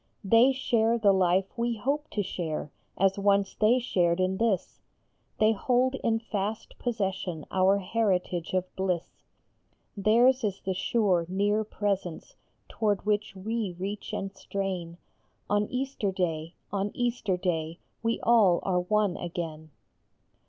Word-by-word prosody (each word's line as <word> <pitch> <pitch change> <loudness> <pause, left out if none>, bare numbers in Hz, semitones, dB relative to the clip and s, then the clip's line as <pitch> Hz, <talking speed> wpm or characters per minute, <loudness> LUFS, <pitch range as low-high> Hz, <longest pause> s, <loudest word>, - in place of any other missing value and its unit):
They 230 +6 +5
share 235 -3 +1
the 205 -3 +4
life 190 +2 +2
we 235 -1 0
hope 285 +7 -1
to 205 - -1
share, 160 -5 -4 0.3
as 195 +1 +2
once 200 -1 +2
they 220 +4 +3
shared 175 -8 +1
in 185 +1 +1
this; 215 -5 0 0.6
They 215 0 +4
hold 250 +4 +1
in 225 -1 +2
fast 215 -1 -4
possession 190 -8 -2
our 190 +1 +4
heritage 185 -4 -1
of 185 0 -2
bliss. 185 -3 -1 0.9
Theirs 235 +5 +4
is 200 -2 -1
the 190 - -2
sure, 185 -3 +1
near 205 +3 +1
Presence 195 -5 -3 0.3
toward 205 -3 -1
which 210 -1 0
we 210 -1 -3
reach 195 +3 -5
and 195 0 -4
strain; 190 -3 -4 0.5
On 205 0 +2
Easter 255 -6 -2
day, 165 -3 -2 0.2
on 200 0 0
Easter 235 -6 0
day, 165 -3 -2 0.2
we 230 0 0
all 215 -7 +5
are 180 -2 +1
one 205 +1 +1
again. 165 -3 -5
200 Hz, 135 wpm, -28 LUFS, 185-225 Hz, 0.9 s, They